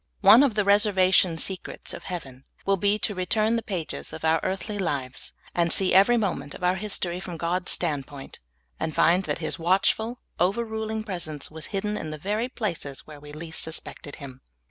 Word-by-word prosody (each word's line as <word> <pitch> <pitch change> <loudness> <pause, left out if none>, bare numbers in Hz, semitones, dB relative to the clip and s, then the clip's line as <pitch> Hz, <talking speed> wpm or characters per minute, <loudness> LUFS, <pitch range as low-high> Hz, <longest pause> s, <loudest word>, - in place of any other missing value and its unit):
One 230 - +9
of 275 -7 +3
the 210 -2 +2
reservation 190 -4 +4
secrets 185 +3 -3
of - - -8
heaven 135 -8 -6 0.2
wnll 195 -1 +2
be 205 +2 +3
to 210 - 0
re 185 -1 -3
turn 220 +3 +3
the 230 - 0
pages 180 -8 -4
of 160 0 -5
our 160 0 +4
earthly 200 +2 -3
lives 140 -8 -2 0.2
and 170 -1 +1
see 190 -1 +3
everj^ 200 +6 +6
moment 145 -9 -2
of - - -10
our 180 +1 +3
history 190 -3 -1
from 180 -2 -6
God's 175 +2 0
standpoint, 145 -4 -2 0.4
and 160 - -2
find 175 +3 +4
that 145 - -1
His 160 0 -3
watchful, 195 +7 +1 0.2
overruling 220 +3 0
pres 185 -6 -3
ence 150 -2 -6
was 160 0 -6
hidden 210 +1 -2
in 155 - -5
the 155 - -5
very 210 - -1
places 170 - -4
where 150 -2 -11
we 145 0 -11
least 160 +2 -5
sus 160 - -2
pected 145 - -10
Him. 130 -3 -10
180 Hz, 195 wpm, -26 LUFS, 160-205 Hz, 0.4 s, One